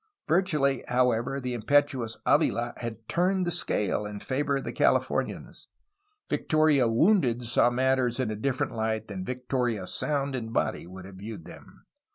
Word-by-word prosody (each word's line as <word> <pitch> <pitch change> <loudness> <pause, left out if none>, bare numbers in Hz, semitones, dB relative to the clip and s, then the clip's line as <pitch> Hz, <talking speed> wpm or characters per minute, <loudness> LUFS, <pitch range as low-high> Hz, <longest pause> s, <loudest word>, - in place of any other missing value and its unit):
Virtually, 150 -7 +2
however, 125 +1 +1
the 125 -2 -3
impetuous 125 0 +1
Avila 120 +1 +2
had 115 -2 -7
turned 185 +2 +1
the 175 - -1
scale 105 - 0
in 105 0 -6
favor 140 +3 -1
of 135 - -5
the - - -4
Californians. - - 0 0.6
Victoria 155 -5 +3
wounded 125 - +3
saw 120 +1 +3
matters 130 0 +1
in 125 -4 0
a - - -3
different 130 +5 -1
light 110 -1 -2
than 95 -2 -5
Victoria 125 -3 -2
sound 140 +6 -2
in 115 -3 -4
body 115 - -1
would 95 +1 -10
have 95 -1 -11
viewed 105 -3 -8
them. - - -14
125 Hz, 155 wpm, -27 LUFS, 110-140 Hz, 0.6 s, Victoria